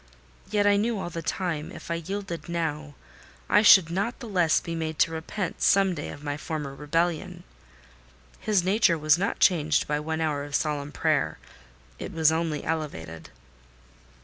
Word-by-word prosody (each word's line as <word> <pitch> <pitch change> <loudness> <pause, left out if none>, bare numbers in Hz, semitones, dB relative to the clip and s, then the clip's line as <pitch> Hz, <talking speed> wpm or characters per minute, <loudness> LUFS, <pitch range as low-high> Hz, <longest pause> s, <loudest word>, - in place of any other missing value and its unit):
Yet 205 -1 +1
I 205 0 +5
knew 225 +2 0
all 175 -3 -5
the 165 - -5
time, 165 -2 -3
if - - -9
I 170 0 -2
yielded 185 -3 -5
now, 155 -3 -3 0.5
I 210 - +5
should 190 -6 +7
not 200 +7 -1
the 240 - -8
less 175 -6 +2
be 170 - -6
made 160 -1 -3
to 165 - +3
repent, 165 +3 -4
some 195 -1 +4
day, 150 -3 -5
of 145 - -10
my 145 -1 -3
former 150 -2 -5
rebellion. 170 +4 -2 1.0
His 210 -5 +1
nature 190 -2 +3
was 155 +1 +3
not 200 - -1
changed 155 -5 +3
by 150 0 0
one 160 +1 -3
hour 150 -3 -1
of 145 0 -5
solemn 145 -2 -1
prayer: - - 0 0.6
it - - -6
was 160 -1 +3
only 160 -2 -1
elevated. 110 - -5
165 Hz, 170 wpm, -26 LUFS, 150-185 Hz, 1.0 s, should